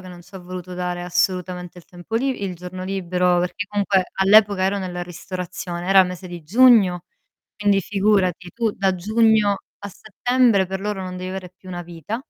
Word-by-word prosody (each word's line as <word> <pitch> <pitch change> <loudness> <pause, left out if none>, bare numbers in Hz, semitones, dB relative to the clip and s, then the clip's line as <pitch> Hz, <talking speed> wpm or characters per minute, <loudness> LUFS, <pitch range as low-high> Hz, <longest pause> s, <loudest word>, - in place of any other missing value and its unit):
che 185 - -11
non 175 -1 -11
ci 195 +3 -21
ha - - -6
voluto 180 0 -8
dare 180 -1 -3
assolutamente 180 0 -2
il 175 - -13
tempo 175 +5 -10
li 260 -3 -1
il 190 -2 -3
giorno 180 +1 -8
libero, 180 -2 0
perché 180 +3 -2
comunque 200 -2 +1
all'epoca 200 0 +5
ero 200 +1 +1
nella 180 -2 -4
ristorazione, 180 0 -6
era 195 0 +7
il 185 - +4
mese 180 +1 -7
di 175 -2 -8
giugno, 200 -2 +5 0.5
quindi 205 -1 +2
figurati 190 -3 0
tu 230 -2 0
da 195 -1 0
giugno 215 +2 +3 0.3
a 205 - -5
settembre 220 +1 +1
per 190 +1 -5
loro 210 -2 -3
non 185 -1 -6
devi 185 0 -5
avere 185 -1 -6
più 185 - -14
una 175 -1 -5
vita 175 +5 -6
185 Hz, 190 wpm, -21 LUFS, 180-205 Hz, 0.5 s, era